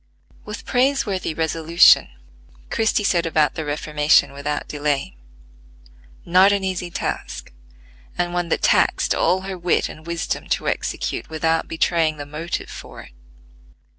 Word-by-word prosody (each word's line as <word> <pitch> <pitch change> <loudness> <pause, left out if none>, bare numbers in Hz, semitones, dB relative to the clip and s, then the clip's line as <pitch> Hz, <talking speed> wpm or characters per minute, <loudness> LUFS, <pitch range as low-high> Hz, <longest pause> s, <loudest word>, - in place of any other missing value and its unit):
With 210 +1 -8
praiseworthy 245 - 0
resolution 165 +1 +4 0.6
Christie 220 -1 +1
set 170 -4 +1
about 155 -2 +2
the 160 - -4
reformation 150 0 +2
without 145 +1 -4
delay; 145 - -2 1.1
not 185 +3 +5
an 200 -1 0
easy 185 -2 -3
task 115 - -5 0.6
and 175 0 -1
one 175 -1 -2
that - - -1
taxed - - +3
all 185 +1 +1
her 190 -1 -6
wit 175 0 +1
and 155 +1 -12
wisdom 170 -1 -3
to - - -1
execute - - -3
without 160 +1 0
betraying 160 -1 0
the 145 - -6
motive 155 +4 -5
for - - -10
it. - - -16
165 Hz, 135 wpm, -21 LUFS, 155-185 Hz, 1.1 s, not